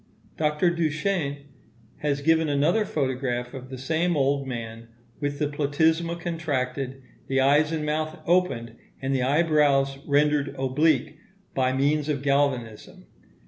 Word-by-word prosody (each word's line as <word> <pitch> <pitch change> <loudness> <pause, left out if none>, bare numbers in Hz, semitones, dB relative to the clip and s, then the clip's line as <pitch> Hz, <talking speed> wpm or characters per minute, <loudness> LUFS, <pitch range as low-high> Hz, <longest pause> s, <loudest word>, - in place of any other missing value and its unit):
Dr. 150 +3 +1
Duchenne 155 -3 -1 0.5
has 140 -1 -1
given 160 0 +3
another 155 +10 +2
photograph 130 -3 -2
of 130 -1 -8
the 130 - -7
same 160 +5 0
old 140 0 +1
man, 115 -2 -6 0.3
with 145 -1 -2
the 150 - 0
platysma 160 +4 +1
contracted, 135 -6 -3 0.2
the 135 0 +1
eyes 145 +3 +4
and 155 -2 -2
mouth 155 +1 -2
opened, 120 -11 +1 0.2
and 135 0 -2
the 130 - +1
eyebrows 140 -1 +2
rendered 145 -1 +2
oblique, 150 +4 +1 0.3
by 130 -1 +1
means 145 +3 +1
of 140 -2 -1
galvanism. 140 -6 -1
145 Hz, 130 wpm, -25 LUFS, 135-155 Hz, 0.5 s, eyes